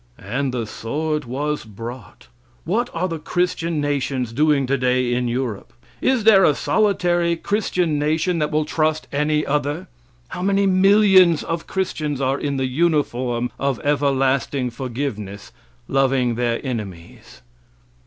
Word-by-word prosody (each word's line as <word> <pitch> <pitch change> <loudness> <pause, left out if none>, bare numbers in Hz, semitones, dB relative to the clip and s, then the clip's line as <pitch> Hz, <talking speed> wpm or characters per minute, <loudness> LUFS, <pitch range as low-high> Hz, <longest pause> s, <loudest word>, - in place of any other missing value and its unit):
And 130 +7 -2
the 120 -3 -2
sword 150 +8 -3
was 145 +5 -3
brought. 115 +4 -10 0.4
What 220 +8 0
are 175 +2 -1
the 165 -3 -4
Christian 170 -1 -1
nations 135 -4 -1
doing 145 0 +2
today 125 -2 +1
in 125 0 0
Europe? 120 -4 -3 0.3
Is 260 -4 +2
there 205 -3 +6
a 150 - +4
solitary 175 -5 +1
Christian 180 -4 -1
nation 160 +4 0
that 150 -1 0
will 155 0 0
trust 155 0 0
any 150 +1 +1
other? 150 +5 -1 0.4
How 180 - -6
many 200 +1 +2
millions 190 -3 +5
of 165 0 -4
Christians 155 -7 -2
are 135 +1 0
in 140 -2 -2
the 130 - 0
uniform 130 -5 0
of 140 -3 -1
everlasting 135 -2 +1
forgiveness, 115 -5 -5 0.4
loving 135 -3 +2
their 120 0 -1
enemies? 100 - -7
145 Hz, 135 wpm, -21 LUFS, 125-170 Hz, 0.4 s, there